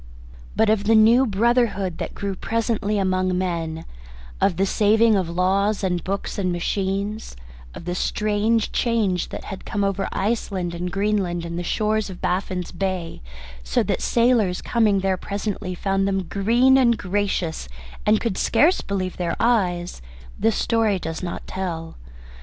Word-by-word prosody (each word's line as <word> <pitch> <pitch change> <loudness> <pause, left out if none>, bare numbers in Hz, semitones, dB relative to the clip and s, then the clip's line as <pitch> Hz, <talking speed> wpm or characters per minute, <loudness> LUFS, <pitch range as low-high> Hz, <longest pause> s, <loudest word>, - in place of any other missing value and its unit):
But 220 -1 +3
of 210 -1 +1
the 225 +1 +4
new 230 +4 +6
brotherhood 210 -4 +1
that - - -5
grew 200 -1 -3
presently 220 0 -1
among 185 -1 +1
men, 165 -3 -3 0.6
of 180 -4 +2
the 195 - +2
saving 215 +3 +3
of 185 -4 0
laws 195 +4 +1
and 180 -3 0
books 200 +1 -3
and 185 -2 0
machines, 195 - -2 0.4
of - - -9
the 175 - -2
strange 215 +4 0
change 215 -7 0
that - - -7
had 195 - -7
come 205 -1 -2
over 195 0 -1
Iceland 195 -4 -2
and 175 +1 -4
Greenland 195 -3 0
and 170 0 -5
the 175 - -2
shores 215 +3 0
of 185 - -9
Baffin's 180 -1 -2
Bay, 185 - -3 0.4
so - - +1
that - - -1
the - - -5
sailors 230 -6 +2
coming 215 -5 +2
there 190 -1 +1
presently 200 -1 -4
found 195 +1 0
them 195 -1 0
green 235 +9 +3
and 235 -3 +4
gracious, 185 - -2 0.3
and 210 0 +3
could 230 -6 -2
scarce 340 +6 +3
believe 185 -2 -3
their 175 -2 -1
eyes, 180 - +1 0.4
this 225 -2 +2
story 225 -3 +1
does 160 -2 -5
not 175 -2 -5
tell. 165 -4 -5
195 Hz, 160 wpm, -23 LUFS, 180-215 Hz, 0.6 s, new